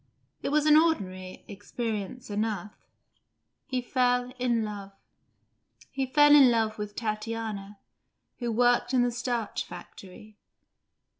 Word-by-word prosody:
It - - -2
was 300 +1 +2
an 305 -1 +6
ordinary 185 - 0
experience 215 +2 -5
enough: 210 -1 -2 0.9
he 255 -4 -2
fell 250 0 +1
in 240 -2 +1
love. 200 -2 -7 1.0
He 270 -1 -2
fell 295 +2 +6
in 275 -3 +8
love 220 -2 0
with 210 0 -5
Tatiana, 215 -2 -4 0.6
who 240 -2 -2
worked 245 +2 +2
in 245 - +4
the 245 - +1
starch 240 -2 -2
factory. 190 +4 -12
230 Hz, 120 wpm, -28 LUFS, 210-250 Hz, 1.0 s, in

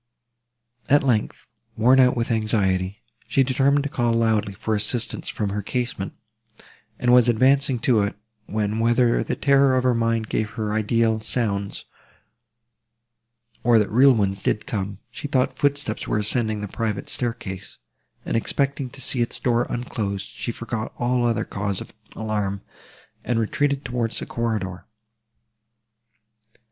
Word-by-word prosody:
At 145 +1 +5
length, 120 -6 0 0.3
worn 125 +4 +5
out 125 0 +5
with 115 0 -1
anxiety, 100 -4 0 0.2
she 135 - +3
determined 140 +2 +2
to 145 - -3
call 120 -3 0
loudly 110 -3 +1
for 110 - -2
assistance 110 +3 -1
from 105 -2 -2
her 105 +1 -2
casement, 120 -3 -3 0.8
and 125 0 +2
was 125 -1 +6
advancing 130 +3 +3
to 120 -5 +3
it, 100 0 -1 0.3
when, 105 +1 -1
whether 120 +1 +3
the - - -2
terror 140 -1 +4
of 130 - +1
her 125 -1 +3
mind 115 -1 0
gave 110 0 -1
her 105 -1 -1
ideal 110 +1 +1
sounds, 105 -3 -2 1.8
or 120 -1 +5
that 105 -2 +1
real 130 +3 +6
ones 100 -2 0
did 105 - 0
come, 100 -2 -3
she 145 - -6
thought 130 -1 0
footsteps 145 -6 -1
were - - 0
ascending 110 0 -1
the 105 - -4
private 105 0 -3
staircase; 115 -6 -4 0.5
and, - - -2
expecting 140 +3 0
to 135 +1 -8
see 125 0 +2
its 120 - 0
door 120 -1 +1
unclose, 105 -5 -3
she 120 - -5
forgot 115 -1 -4
all 125 0 +1
other 115 -2 +1
cause 100 -1 -3
of - - -10 0.2
alarm, 105 -3 -2 0.6
and 120 - 0
retreated 140 +5 0
towards 120 -2 -2
the - - -3
corridor. 105 -6 -3
115 Hz, 145 wpm, -23 LUFS, 105-125 Hz, 1.8 s, was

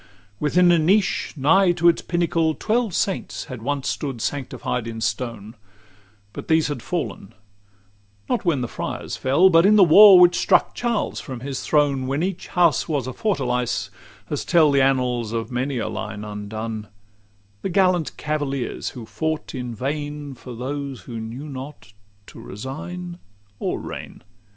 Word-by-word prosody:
LX - - -25 0.3
Within 175 +4 +4
a 170 - +4
niche, 190 +6 +1
nigh 175 +7 +4
to 175 0 +2
its 170 - +4
pinnacle, 165 -2 0
Twelve 225 -3 0
saints 195 - -2
had 130 -5 -8
once 140 +2 -2
stood 135 -5 -3
sanctified 125 -3 -3
in 115 -1 -6
stone; 110 -1 -3 0.8
But - - -8
these 160 -2 +3
had 145 -5 -4
fallen, 165 - -4 0.9
not 245 - -1
when 165 -8 +1
the 120 - -2
friars - - -5
fell, 160 +9 +4
But 165 0 +6
in 205 +3 +5
the 205 - +7
war 190 +3 +9
which 175 0 +6
struck - - +3
Charles 235 -3 -1
from 130 -4 -7
his 135 0 -4
throne, 140 -4 +1
When 140 +5 -1
each 190 -1 -3
house 175 -2 +2
was 145 -5 -1
a 130 - -5
fortalice, 125 - -1 0.4
as 145 - -2
tell 160 -4 +4
The 140 -1 +3
annals 125 -4 +1
of 115 -1 -3
full - - -10
many 130 +2 -1
a 115 - -2
line 105 -1 -5
undone, 105 +1 -5 0.7
The - - -2
gallant 180 -3 +1
cavaliers, 145 -4 -3
who 115 - -7
fought 155 +9 -3
in 125 -3 -5
vain 145 +3 -4
For 125 -1 -10
those 135 +2 -5
who 115 -3 -7
knew 115 +7 -7
not 130 -6 -9 0.3
to - - -13
resign 170 - -7 0.4
or - - -2
reign. - - -8
140 Hz, 165 wpm, -22 LUFS, 125-170 Hz, 0.9 s, war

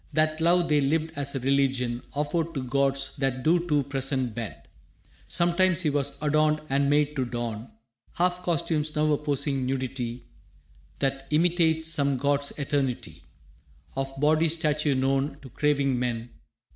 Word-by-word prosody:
That 155 0 +1
love 170 +1 +3
they 150 -2 +3
lived 160 +3 0
as 140 0 0
a - - 0
religion 130 -2 +1
Offered 160 +3 -1
to 135 - -2
gods 135 +1 0
that 135 -2 -1
do 170 +2 +2
to 150 -3 +2
presence 135 -2 0
bend. 115 -2 -5 0.7
Sometimes 175 +1 +2
he 155 -4 +1
was 140 0 -1
adorned 155 0 +2
and 140 +1 +2
made 150 0 +2
to 135 - 0
don 120 -2 -4 0.4
Half 180 +1 0
costumes, 155 -3 -1
now 155 0 +2
a 145 - +3
posing 140 -2 0
nudity 125 -2 -3 0.7
That 135 0 -2
imitates 160 0 +2
some 140 -4 +2
god's 140 +1 +1
eternity 140 -3 -2 0.7
Of 135 0 -2
body 155 +3 +3
statue 150 -3 +1
known 135 +2 0
to 130 - -10
craving 140 -2 +1
men. 120 -1 -3
145 Hz, 145 wpm, -26 LUFS, 135-155 Hz, 0.7 s, love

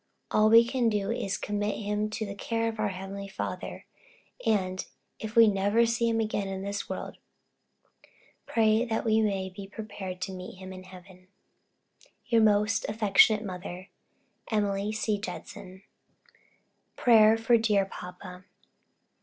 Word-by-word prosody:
All 215 0 +4
we 230 +1 +8
can 240 -1 +1
do 205 -2 -1
is 195 - -2
to - - -5
commit 205 0 -1
him 210 0 -2
to 215 +1 -4
the 200 - -6
care 230 +3 -2
of 225 -1 -4
our 215 - +1
heavenly 195 +1 -6
Father, 195 - -6 0.6
and, 185 -4 0 0.4
if 220 +1 -6
we 230 -1 +8
never 205 +3 +3
see 230 0 +1
him 225 0 +1
again 215 -2 -1
in 190 0 -5
this 200 0 -4
world, - - -6 1.3
pray 220 0 +3
that 230 -2 -2
we 220 0 +3
may 195 -3 0
be 195 0 -8
prepared 200 -3 -7
to 190 - -3
meet 185 0 -8
him 190 0 -9
in 185 0 -10
heaven 185 0 -15 1.0
Your 230 -2 +3
most 215 +1 +3
affectionate 215 0 +4
mother, 180 0 -7 0.6
Emily 205 -1 0
C. 215 -1 -1
Judson 190 -2 -8 1.1
PRAYER 220 -2 +6
FOR 225 +1 +3
DEAR 210 -3 +2
PAPA. 180 0 -10
210 Hz, 145 wpm, -28 LUFS, 195-220 Hz, 1.3 s, we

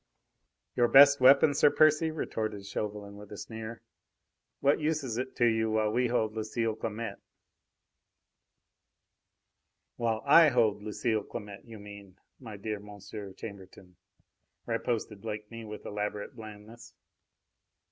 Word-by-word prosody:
"Your 120 - +3
best 140 +3 +8
weapon, 140 +3 +6
Sir 145 - +5
Percy!" 155 +2 +4
retorted 110 -9 -4
Chauvelin, 100 0 -5
with 105 0 -12
a 105 - -8
sneer. 110 +1 -8 0.8
"What 140 +1 +3
use 155 -1 -1
is 120 -3 -3
it 130 +1 -5
to 120 - +2
you 110 -1 +2
while 110 -1 +1
we 125 +2 +1
hold 110 -3 0
Lucile 110 +1 -2
Clamette?" 110 -1 -5 2.8
"While 115 -1 -1
I 155 +3 +8
hold 110 -5 +2
Lucile 110 +1 -1
Clamette, 105 -2 -9
you 115 -2 -11
mean, 100 -2 -12 0.2
my 110 -5 -9
dear 105 +1 -4
Monsieur 100 0 -9
Chambertin," 95 -3 -11 0.7
riposted 115 -3 -3
Blakeney 110 +1 -7
with 105 0 -9
elaborate 105 +3 -4
blandness. 110 +1 -12
110 Hz, 125 wpm, -29 LUFS, 105-120 Hz, 2.8 s, best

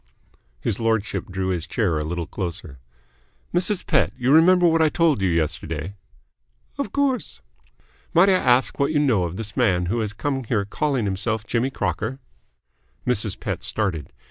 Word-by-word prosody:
His 100 - -2
lordship 110 -2 -1
drew 95 0 -3
his 90 -2 -2
chair 90 -9 0
a - - -2
little 85 +2 -3
closer. 85 - -6 0.7
"Mrs. 185 +2 0
Pett, 130 - +2
you 125 +1 +1
remember 175 +3 +6
what 165 0 +3
I 160 - +5
told 160 - +2
you 95 - +2
yesterday?" 80 +1 -2 0.9
"Of 280 - -2
course." 270 - -1 0.7
"Might 175 +4 +5
I - - +5
ask 130 -8 +2
what 140 +2 +2
you 155 - +1
know 120 -11 +2
of 85 +1 -5
this 110 -2 -5
man 95 -7 +2
who 120 - 0
has 105 -2 -2
come 135 +4 -2
here 105 -3 0
calling 135 +2 -1
himself 105 +3 -1
Jimmy 120 +4 0
Crocker?" 105 +2 -2 0.9
Mrs. 110 -4 0
Pett 90 -4 -4
started. 100 -7 -2
110 Hz, 165 wpm, -23 LUFS, 90-140 Hz, 0.9 s, remember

